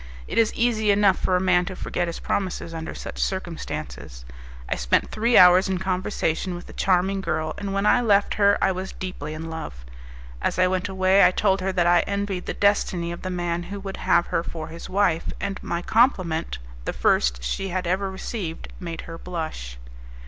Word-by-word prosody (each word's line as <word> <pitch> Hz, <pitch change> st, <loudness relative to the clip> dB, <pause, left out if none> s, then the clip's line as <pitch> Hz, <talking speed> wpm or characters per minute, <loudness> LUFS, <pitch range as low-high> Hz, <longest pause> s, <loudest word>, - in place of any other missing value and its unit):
It -, -, 0 dB
is 225 Hz, -1 st, +4 dB
easy 225 Hz, -3 st, +1 dB
enough 200 Hz, -2 st, +4 dB
for 185 Hz, -, +1 dB
a -, -, +3 dB
man 180 Hz, -1 st, +3 dB
to 185 Hz, 0 st, -6 dB
forget 175 Hz, -1 st, -2 dB
his 170 Hz, -, -5 dB
promises 185 Hz, -3 st, -2 dB
under 165 Hz, +1 st, -5 dB
such -, -, -6 dB
circumstances. 165 Hz, -, -5 dB, 0.4 s
I -, -, 0 dB
spent -, -, +1 dB
three 230 Hz, +2 st, +3 dB
hours 180 Hz, +2 st, +7 dB
in 190 Hz, -, 0 dB
conversation 185 Hz, -1 st, -1 dB
with 175 Hz, -, -8 dB
the -, -, -12 dB
charming 190 Hz, +1 st, +1 dB
girl 155 Hz, -4 st, -2 dB
and 200 Hz, -1 st, -4 dB
when 195 Hz, +1 st, 0 dB
I 245 Hz, -, +5 dB
left 205 Hz, -3 st, +3 dB
her 200 Hz, -1 st, +4 dB
I 190 Hz, -, +4 dB
was 185 Hz, +1 st, -5 dB
deeply 155 Hz, -5 st, -6 dB
in 165 Hz, +1 st, -6 dB
love. 60 Hz, -, -7 dB, 0.6 s
As -, -, -1 dB
I 185 Hz, -, +5 dB
went 185 Hz, +2 st, 0 dB
away, 190 Hz, +1 st, +4 dB
I -, -, +8 dB
told 190 Hz, +1 st, +1 dB
her 190 Hz, +1 st, 0 dB
that 175 Hz, -2 st, +2 dB
I 175 Hz, 0 st, +5 dB
envied 200 Hz, -2 st, -2 dB
the -, -, -3 dB
destiny 185 Hz, -4 st, +1 dB
of 175 Hz, -, -7 dB
the 185 Hz, -, -4 dB
man 175 Hz, -1 st, -2 dB
who 200 Hz, 0 st, -5 dB
would 195 Hz, -1 st, -6 dB
have 170 Hz, -, +3 dB
her 165 Hz, -, +2 dB
for 160 Hz, -2 st, -6 dB
his 165 Hz, +1 st, -9 dB
wife, 185 Hz, -4 st, +1 dB
and 200 Hz, -1 st, -4 dB
my 170 Hz, +1 st, -3 dB
compliment, 185 Hz, -, +2 dB, 0.3 s
the -, -, -2 dB
first -, -, +2 dB
she 195 Hz, -, -2 dB
had 185 Hz, 0 st, -2 dB
ever 190 Hz, +3 st, 0 dB
received, 190 Hz, -3 st, -5 dB
made 170 Hz, -2 st, -5 dB
her 165 Hz, 0 st, -9 dB
blush. 155 Hz, -, -5 dB
185 Hz, 200 wpm, -24 LUFS, 170-195 Hz, 0.6 s, I